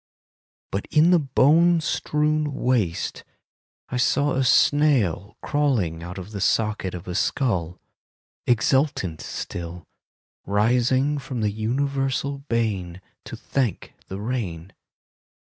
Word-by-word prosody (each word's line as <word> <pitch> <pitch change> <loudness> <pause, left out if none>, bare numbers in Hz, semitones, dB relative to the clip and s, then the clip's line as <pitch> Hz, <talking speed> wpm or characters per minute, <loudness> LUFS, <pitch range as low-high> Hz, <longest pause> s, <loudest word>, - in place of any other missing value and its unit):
But 100 - -3
in 160 +3 +4
the 175 - +6
bone 160 +5 +4
strewn 150 -1 0
waste 115 -12 -1 0.7
I 125 - -2
saw 140 +4 +2
a 135 0 +1
snail 130 - +3
Crawling 120 - 0
out 90 +2 -7
of 95 +2 -8
the 100 -2 -5
socket 105 -4 0
of 90 +1 -9
a 90 - -4
skull, 90 - -1 0.7
Exultant 120 - +1
still;— 85 0 -6 0.6
Rising 125 +7 +2
from 125 -3 -5
the 105 -1 +1
universal 135 +5 -1
bane 105 - -2 0.3
To - - -7
thank 130 -8 -2
the 95 - -6
rain. 100 -7 -4
120 Hz, 110 wpm, -24 LUFS, 95-140 Hz, 0.7 s, the